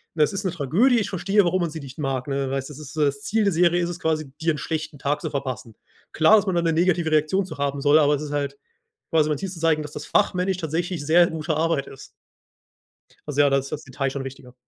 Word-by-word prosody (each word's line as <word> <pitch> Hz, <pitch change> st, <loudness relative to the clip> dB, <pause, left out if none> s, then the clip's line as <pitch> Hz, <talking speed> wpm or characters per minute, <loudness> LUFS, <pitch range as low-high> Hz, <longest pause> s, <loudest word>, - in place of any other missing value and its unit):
Es 155 Hz, +3 st, +2 dB
ist 195 Hz, +1 st, -4 dB
'ne 185 Hz, -, 0 dB
Tragödie. 185 Hz, -, +2 dB
Ich 205 Hz, -, -2 dB
verstehe, 195 Hz, +3 st, +2 dB
warum 180 Hz, +2 st, +1 dB
man 170 Hz, -, 0 dB
sie 160 Hz, -, -6 dB
nicht 135 Hz, -2 st, -10 dB
mag. 135 Hz, -3 st, -2 dB
Ne, 135 Hz, -1 st, -1 dB
weil 135 Hz, -, 0 dB
es 135 Hz, -, -7 dB
ist 150 Hz, +1 st, -10 dB
das 140 Hz, -2 st, 0 dB
Ziel 220 Hz, +1 st, +1 dB
der 200 Hz, -2 st, +2 dB
Serie 175 Hz, +1 st, +3 dB
ist 170 Hz, -, -1 dB
es 175 Hz, 0 st, -6 dB
quasi 155 Hz, -4 st, -1 dB
dir 165 Hz, +1 st, +2 dB
'n -, -, -5 dB
schlechten 155 Hz, -2 st, -4 dB
Tag 145 Hz, +2 st, -1 dB
zu -, -, -3 dB
verpassen. 130 Hz, -5 st, -5 dB, 0.4 s
Klar, 160 Hz, +7 st, +6 dB
dass 210 Hz, -, +1 dB
man 190 Hz, -3 st, -1 dB
da 170 Hz, -, +2 dB
'ne 165 Hz, -1 st, +1 dB
negative 170 Hz, -1 st, +1 dB
Reaktion 155 Hz, +6 st, +2 dB
zu 155 Hz, -5 st, -9 dB
haben 140 Hz, 0 st, -2 dB
soll. 145 Hz, +2 st, +5 dB
Aber 145 Hz, -1 st, +4 dB
es 145 Hz, -, -5 dB
ist 150 Hz, -1 st, -6 dB
halt 140 Hz, -1 st, -2 dB, 0.5 s
quasi, 155 Hz, -2 st, +3 dB
mein 150 Hz, -2 st, -1 dB
Ziel 195 Hz, -, -4 dB
zu 175 Hz, -3 st, -9 dB
zeigen, 160 Hz, -1 st, +2 dB
dass 150 Hz, -1 st, -8 dB
das 150 Hz, -, -7 dB
fachmännisch 190 Hz, -2 st, +1 dB
tatsächlich 170 Hz, -1 st, -3 dB
sehr 170 Hz, +3 st, +5 dB
gute 160 Hz, 0 st, -3 dB
Arbeit 160 Hz, -3 st, 0 dB
ist. 135 Hz, -, -11 dB, 1.2 s
Also 145 Hz, -1 st, +2 dB
ja, 145 Hz, -, +4 dB
da 135 Hz, -, +3 dB
ist 135 Hz, 0 st, -4 dB
das 150 Hz, -, -5 dB
Detail 135 Hz, +1 st, -3 dB
schon 135 Hz, 0 st, -4 dB
wichtiger. 130 Hz, -2 st, -10 dB
155 Hz, 260 wpm, -23 LUFS, 140-175 Hz, 1.2 s, Klar